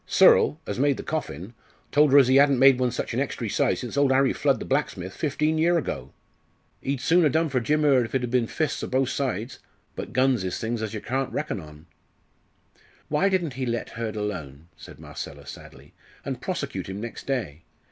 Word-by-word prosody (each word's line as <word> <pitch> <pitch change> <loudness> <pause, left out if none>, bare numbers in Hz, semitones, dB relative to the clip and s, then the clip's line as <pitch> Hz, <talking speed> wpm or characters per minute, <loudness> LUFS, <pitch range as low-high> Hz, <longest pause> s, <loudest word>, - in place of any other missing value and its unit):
Searle, 150 - +5
as - - -4
made 140 0 +2
the - - -6
coffin, 110 - -5 0.4
told 150 -1 +4
her 140 - +7
as 135 -3 +7
ee 130 +1 +5
'adn't 140 -1 +5
made 135 0 +6
one 125 -1 +2
such 120 - -4
an - - 0
extry - - -2
size - - 0
since - - -6
old 140 -1 +3
Harry 135 0 +3
Flood, 140 -3 +1
the - - -6
blacksmith, 100 -10 -2
fifteen 155 +1 0
year 170 +2 +3
ago. 160 - -4 0.7
Ee'd 135 -1 -2
soon 170 +7 +3
a 150 - +4
done 160 +3 +1
for 130 -2 +1
Jim 150 +6 +1
Hurd 135 -4 +4
if 115 - -7
it 130 - +1
'ad 120 - -3
been 125 -2 +2
fists 155 +2 -2
o' - - -2
both 130 0 +1
sides. 125 -4 -3 0.4
But - - -6
guns 130 -4 +2
is 95 - -3
things 115 0 -3
as 110 0 -4
yer 105 - -5
can't 130 +2 -2
reckon 150 -8 -3
on.". 75 -1 -13 1.2
"Why 170 +7 +2
didn't 175 -7 0
he 130 0 -3
let 120 0 -2
Hurd 115 -2 -5
alone," 85 -8 -5
said - - -13
Marcella, - - -8
sadly, - - -12 0.3
"and - - -4
prosecute - - -4
him 95 +1 -5
next 115 +2 -7
day? 110 - -3
130 Hz, 210 wpm, -25 LUFS, 110-145 Hz, 1.2 s, her